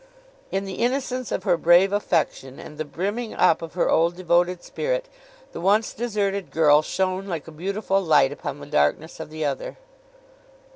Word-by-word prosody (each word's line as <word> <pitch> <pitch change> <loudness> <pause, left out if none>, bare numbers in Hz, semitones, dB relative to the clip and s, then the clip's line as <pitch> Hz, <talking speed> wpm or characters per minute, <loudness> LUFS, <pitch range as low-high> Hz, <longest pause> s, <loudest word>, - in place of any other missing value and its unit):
In 195 +1 -2
the 190 -2 -6
innocence 255 0 -1
of - - -2
her 175 - +2
brave 175 +4 +5
affection, 160 -9 -1
and 150 - -11
the 155 - -2
brimming 200 - -4
up 160 - +3
of 165 0 -8
her 180 - +1
old 170 +2 +2
devoted 175 0 +1
spirit, - - -2 0.4
the - - -7
once 205 +5 +2
deserted 200 -4 -2
girl 150 -2 +5
shone 190 +4 -2
like 165 -5 -4
a - - -9
beautiful 195 +4 -1
light 155 - +4
upon - - -6
the - - -9
darkness 75 - 0
of 160 - -7
the 155 0 -4
other. 140 -2 -3
180 Hz, 175 wpm, -24 LUFS, 160-200 Hz, 0.4 s, brave